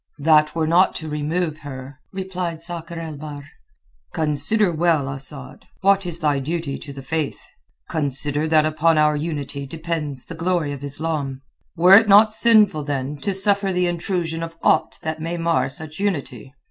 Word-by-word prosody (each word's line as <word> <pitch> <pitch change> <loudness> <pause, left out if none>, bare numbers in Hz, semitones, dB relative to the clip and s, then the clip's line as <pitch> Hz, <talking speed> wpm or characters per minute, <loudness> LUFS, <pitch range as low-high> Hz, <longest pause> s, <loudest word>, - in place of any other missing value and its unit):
"That 155 +1 +3
were 160 -1 +1
not 175 +4 +3
to 160 - -5
remove 155 +2 -2
her," 135 -2 -9
replied 185 -4 -4
Sakr 170 -1 -7
el 160 -3 -6
Bahr. 145 -1 -8 0.7
"Consider 160 +7 +1
well, 160 -3 +1
Asad, 135 0 -8
what 195 -1 +3
is 170 -2 -3
thy 145 -2 +2
duty 155 0 -3
to 145 - -9
the 135 -1 -9
Faith. 155 +1 -2 0.5
Consider 145 0 -1
that 155 -1 +4
upon 155 +1 +2
our 150 0 +4
unity 145 -3 -4
depends 155 -3 -3
the - - -8
glory 165 -2 -1
of 140 0 -8
Islam. 140 -2 -3 0.3
Were 180 +2 +6
it 215 +2 +8
not 210 +2 +7
sinful, 215 -9 +4
then, 145 0 -3
to 200 +7 -2
suffer 195 0 +1
the 180 0 +1
intrusion 170 -1 -2
of 165 0 -6
aught - - +2
that 160 0 -4
may 165 +2 -3
mar 165 -6 +1
such 155 +4 -7
unity? 140 - -3
160 Hz, 165 wpm, -22 LUFS, 145-175 Hz, 0.7 s, it